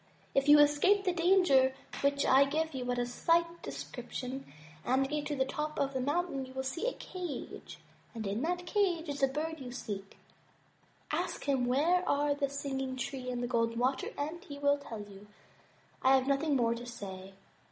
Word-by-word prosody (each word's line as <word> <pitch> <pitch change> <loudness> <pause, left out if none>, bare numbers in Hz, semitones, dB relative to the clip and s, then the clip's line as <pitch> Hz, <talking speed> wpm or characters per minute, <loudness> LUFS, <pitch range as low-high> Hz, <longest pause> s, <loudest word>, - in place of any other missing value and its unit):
If 275 +1 +2
you 295 - +10
escape 295 +8 +5
the 365 -2 +1
danger 335 -7 +4 0.2
of - - -6
which 280 0 +2
I 270 +2 +6
give 315 +3 -1
you 255 -2 -4
but 245 0 -1
a 245 - +1
slight 335 +7 +1
description, 260 - -6 0.3
and 265 +2 +2
get 295 +1 -2
to 295 - -2
the 265 -1 +1
top 300 +3 -3
of 275 0 0
the 260 - -1
mountain, 290 0 -1
you 260 0 -10
will 265 0 -3
see 330 - -2
a - - 0
cage, 360 -5 -7 0.4
and 220 -2 -4
in 200 +4 -1
that 355 +3 -1
cage 355 -4 +1
is 285 0 -3
the 270 - +4
Bird 310 +4 -3
you 250 -2 -7
seek. 200 -5 -6 0.9
Ask 340 +3 -2
him 265 -3 +1
where 325 +8 +3
are 290 0 +2
the 285 -1 -1
Singing 270 -2 -3
Tree 260 0 -4
and 245 -1 -2
Golden 230 -1 0
Water 255 +2 +1
and 315 +5 -4
he 285 -7 -8
will 285 0 +2
tell 225 -6 -7
you. 205 0 -12 0.7
I 265 +1 +6
have 260 -1 +2
nothing 280 +2 +1
more 235 -3 +3
to 240 +1 -7
say." 195 -5 -8
275 Hz, 195 wpm, -32 LUFS, 255-315 Hz, 0.9 s, you